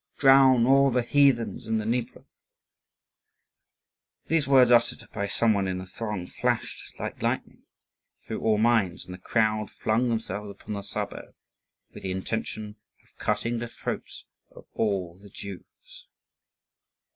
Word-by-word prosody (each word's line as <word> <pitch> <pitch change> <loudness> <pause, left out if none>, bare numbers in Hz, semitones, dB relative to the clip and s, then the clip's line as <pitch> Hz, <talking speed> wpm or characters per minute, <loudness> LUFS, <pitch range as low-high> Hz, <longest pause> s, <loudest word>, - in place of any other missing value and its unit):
Drown 135 -3 +6
all 135 +1 +5
the 125 -1 +1
heathens 135 -4 +2
in 110 0 +1
the 110 - -2
Dnieper!" 120 +1 -2 2.0
These 160 -4 +1
words 130 -3 +6
uttered 120 -1 +3
by 100 -1 -2
some 110 +2 +2
one 100 -2 0
in 95 -1 -2
the 90 - -6
throng 105 -1 -5
flashed - - -2 0.2
like - - -6
lightning - - -3 0.6
through - - -5
all 110 -1 +2
minds, 110 -5 +2
and 90 - -9
the 90 - -10
crowd 110 -2 0
flung 115 +3 0
themselves 105 -3 -3
upon 100 +1 -8
the 100 - -4
suburb 105 0 -5 0.6
with - - -10
the 95 - -4
intention 105 +2 -4 0.3
of - - -32
cutting 115 +3 -1
the 120 - -4
throats - - -6 0.2
of - - -15
all 95 -5 -1
the 100 0 -14
Jews. - - -11
110 Hz, 145 wpm, -26 LUFS, 100-120 Hz, 2.0 s, Drown